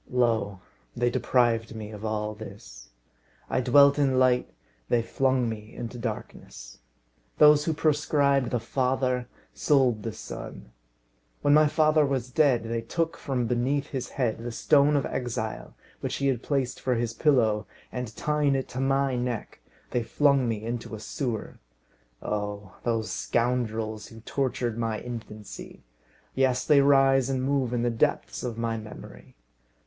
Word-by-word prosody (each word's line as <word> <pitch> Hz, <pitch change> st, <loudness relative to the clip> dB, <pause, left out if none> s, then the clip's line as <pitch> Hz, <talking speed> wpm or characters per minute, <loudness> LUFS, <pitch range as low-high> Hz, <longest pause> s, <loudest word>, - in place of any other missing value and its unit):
Lo! 110 Hz, -6 st, +1 dB, 0.4 s
they 120 Hz, 0 st, +1 dB
deprived 115 Hz, -3 st, +1 dB
me 110 Hz, -1 st, -7 dB
of 105 Hz, -1 st, -9 dB
all 105 Hz, -1 st, -2 dB
this. 100 Hz, -, -11 dB, 0.6 s
I -, -, +2 dB
dwelt 140 Hz, +3 st, +5 dB
in 135 Hz, -2 st, +2 dB
light, 125 Hz, -1 st, +3 dB, 0.4 s
they 120 Hz, -1 st, +2 dB
flung 130 Hz, 0 st, +1 dB
me 110 Hz, -1 st, -7 dB
into 120 Hz, +1 st, -6 dB
darkness. -, -, -7 dB, 0.6 s
Those 150 Hz, 0 st, +6 dB
who 160 Hz, -, +1 dB
proscribed 145 Hz, -4 st, +2 dB
the 125 Hz, -, 0 dB
father, 125 Hz, +1 st, 0 dB, 0.3 s
sold 130 Hz, -7 st, +2 dB
the 115 Hz, -, -4 dB
son. 105 Hz, -, -9 dB, 0.7 s
When 145 Hz, -, +4 dB
my 155 Hz, 0 st, +6 dB
father 155 Hz, 0 st, +3 dB
was 130 Hz, -3 st, -1 dB
dead, 135 Hz, -5 st, +3 dB
they 115 Hz, 0 st, -2 dB
took 165 Hz, +8 st, -2 dB
from 130 Hz, -4 st, -2 dB
beneath 130 Hz, +5 st, 0 dB
his 130 Hz, -3 st, -4 dB
head 120 Hz, -5 st, -1 dB
the 120 Hz, +1 st, -5 dB
stone 145 Hz, +5 st, +3 dB
of 140 Hz, -, +1 dB
exile 115 Hz, -3 st, -4 dB, 0.2 s
which -, -, -3 dB
he 140 Hz, -, -2 dB
had 125 Hz, -3 st, -1 dB
placed 135 Hz, -4 st, -2 dB
for 130 Hz, -1 st, +1 dB
his 115 Hz, 0 st, -1 dB
pillow, 115 Hz, -7 st, +2 dB, 0.2 s
and, 125 Hz, 0 st, -4 dB
tying 150 Hz, 0 st, +1 dB
it 135 Hz, -, -2 dB
to 130 Hz, -, -5 dB
my 135 Hz, 0 st, +1 dB
neck, 120 Hz, -2 st, -3 dB, 0.3 s
they 125 Hz, -, +1 dB
flung 140 Hz, +1 st, +2 dB
me 110 Hz, -1 st, -3 dB
into 115 Hz, -1 st, -4 dB
a -, -, -8 dB
sewer. 115 Hz, -1 st, -4 dB, 0.6 s
Oh! 105 Hz, -2 st, -4 dB
those 115 Hz, -2 st, -1 dB
scoundrels 115 Hz, -3 st, -1 dB
who 115 Hz, -1 st, -13 dB
tortured 120 Hz, -2 st, -2 dB
my 115 Hz, -2 st, -1 dB
infancy! 110 Hz, -4 st, -9 dB, 0.5 s
Yes, 130 Hz, -1 st, +1 dB
they 145 Hz, -2 st, +6 dB
rise 135 Hz, -2 st, +4 dB
and 130 Hz, -1 st, -1 dB
move 135 Hz, -2 st, 0 dB
in 120 Hz, -1 st, 0 dB
the 120 Hz, -, +1 dB
depths -, -, 0 dB
of 115 Hz, -2 st, -4 dB
my 115 Hz, -1 st, -1 dB
memory. 110 Hz, -1 st, -11 dB
125 Hz, 155 wpm, -27 LUFS, 115-135 Hz, 0.7 s, Those